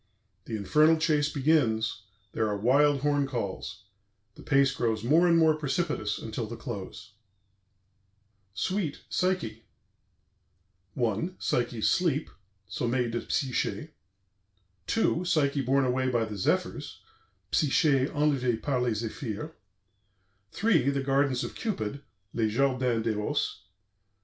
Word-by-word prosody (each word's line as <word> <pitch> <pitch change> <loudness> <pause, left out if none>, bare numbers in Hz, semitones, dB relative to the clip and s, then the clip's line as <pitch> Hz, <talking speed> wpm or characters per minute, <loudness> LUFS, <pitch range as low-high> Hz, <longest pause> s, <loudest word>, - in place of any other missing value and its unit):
The 115 - -4
Infernal 150 +11 +4
Chase 150 -2 +1
begins, 115 -9 +1 0.3
there 110 0 0
are 105 -1 -1
wild 140 +6 +3
horn 145 -1 +1
calls; 115 -8 -5 0.5
the - - -14
pace 135 0 +3
grows 110 -5 -1
more 160 +8 +4
and 170 -1 +5
more 160 -1 +5
precipitous 150 -7 -2
until 110 0 -5
the 115 - -6
close. 105 -3 -7 1.4
SUITE, 185 - -2
"PSYCHE" 165 -13 -1 1.3
1. 120 - -1
PSYCHE'S 120 -2 0
SLEEP 160 -5 +1 0.4
(Sommeil 120 0 -1
de 120 - -2
Psyché) 130 -3 -1 1.0
2. 185 -6 +1
PSYCHE 145 -5 +1
BORNE 135 +2 +2
AWAY 130 +1 +1
BY 120 -2 +1
THE 105 -2 -7
ZEPHYRS 95 - -1 0.5
(Psyché 140 -2 +3
enlevée 135 -6 +1
par 135 -2 -1
les 115 -2 -1
Zéphirs) 115 +6 -5 1.0
3. 175 - +2
THE 140 -1 -1
GARDENS 135 -1 +1
OF - - -5
CUPID 140 - -3 0.3
(Les 110 -2 +1
Jardins 125 -2 +1
d'Eros) 105 -2 -2
4. - - -37
130 Hz, 120 wpm, -28 LUFS, 115-150 Hz, 1.4 s, and